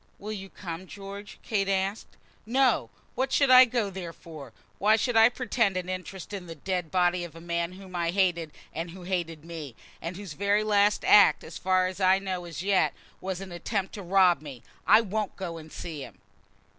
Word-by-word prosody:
"Will 210 +2 -7
you 195 -2 -6
come, 180 -1 -7
George?" 200 +1 -9
Kate 195 -3 0
asked. 195 +2 -2 0.3
"No; 260 +3 +2 0.2
what 265 - -1
should 280 -2 +3
I 255 0 +10
go 230 -4 -1
there 180 -3 -6
for? 155 -7 -11 0.3
Why 210 +3 +5
should 240 +2 -1
I 225 +1 +8
pretend 230 -6 0
an 180 0 -4
interest 185 +1 -6
in 190 -3 -6
the 165 - -7
dead 180 +1 -3
body 180 0 +2
of 170 -2 -9
a - - -9
man 170 +1 -2
whom 185 -1 -11
I 170 -1 0
hated 175 -4 +1 0.2
and 165 +2 -4
who 180 +2 -10
hated 170 -4 -3
me; 160 -7 -7 0.3
whose 180 +1 -6
very 200 +5 +1
last 205 -1 +2
act, 205 - +6
as - - -9
far 185 -1 +2
as 185 +1 -4
I 190 0 +5
know 185 -2 -4
as 170 0 -6
yet, 195 -1 +2 0.2
was 190 0 -4
an 195 -2 -8
attempt 190 +3 -3
to 205 - -6
rob 180 -4 +4
me? 140 -6 -10 0.2
I 225 - +7
won't 215 -1 -3
go 175 -4 -5
and 155 0 -13
see 160 -4 -6
him." - - -12
185 Hz, 200 wpm, -27 LUFS, 170-200 Hz, 0.3 s, I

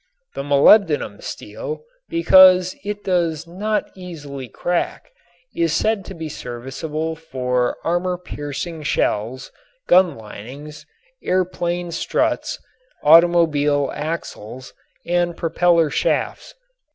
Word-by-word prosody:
The - - -4
molybdenum 145 +5 +4
steel, 470 -2 -7 0.3
because 185 - +6
it 205 0 -5
does 170 -4 0
not 205 +5 -2
easily 145 -8 -8
crack, 175 - -3 0.4
is 165 -1 +1
said 210 +3 0
to 195 - -9
be 160 -1 -5
serviceable 150 +5 -5
for 125 -6 -2
armor 180 +2 0
piercing 160 -1 -6
shells, 130 -4 -1 0.4
gun 180 -5 +4
linings, 130 +8 -10 0.3
air 185 0 +1
plane 175 -1 -3
struts, - - -1 0.5
automobile 150 -4 +4
axles 130 -6 -6 0.3
and 175 0 0
propeller 170 -2 +2
shafts. 165 - -1
165 Hz, 100 wpm, -21 LUFS, 145-180 Hz, 0.5 s, because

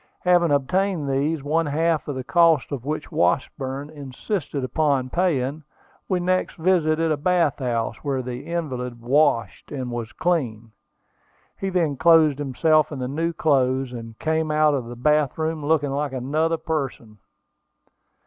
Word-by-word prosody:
Having 175 -2 +3
obtained 155 +4 0
these, 140 +2 0
one 160 +2 +1
half 160 +2 0
of 145 - -3
the 130 - -4
cost 165 -1 +3
of 135 -3 -5
which 150 +1 -4
Washburn 135 - -1
insisted 145 +2 -4
upon 130 -1 0
paying, 155 -5 0 0.5
we 185 - +1
next 185 +1 0
visited 165 -2 +2
a 155 - +1
bath 165 -2 +1
house, 120 -4 -1
where 135 -3 -2
the 125 +1 -6
invalid 125 -8 -3
"washed 125 -3 +1
and 130 -4 -4
was 120 -1 -5
clean." 120 -10 -1 0.8
He 195 - -3
then 165 -7 0
clothed 160 -2 +5
himself 155 +3 +2
in 145 - -5
the 125 -1 -3
new 165 +5 -1
clothes, 135 -5 +1
and 115 -2 -8
came 160 0 -1
out 155 0 +3
of 135 -4 -2
the 120 +1 -8
bath 150 +2 +1
room 160 -1 -2
looking 145 -2 +1
like 140 0 -2
another 155 +6 0
person. 135 -10 -4
145 Hz, 150 wpm, -23 LUFS, 130-160 Hz, 0.8 s, clothed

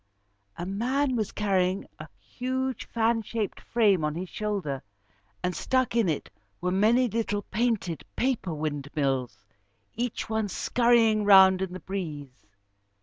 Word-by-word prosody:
A 175 - -4
man 255 +8 0
was 215 -4 -1
carrying 190 -2 0
a - - -8
huge 260 +1 -3
fan 230 0 +1
shaped 220 -1 -3
frame 205 -8 +2
on 150 0 -1
his 180 +2 -5
shoulder, 195 -11 -3 0.6
and 180 -1 -1
stuck 255 -3 0
in 225 -6 +3
it 155 - -3 0.3
were 180 +1 -1
many 225 +7 +3
little 215 -2 -2
painted 215 -7 -1
paper 240 -8 0
windmills, 140 -7 -2 0.5
each 240 0 -3
one 220 -1 -1
scurrying 230 +1 +3
round 190 -2 +7
in 190 -2 -2
the 185 - -6
breeze. 155 - -6
200 Hz, 135 wpm, -27 LUFS, 175-230 Hz, 0.6 s, round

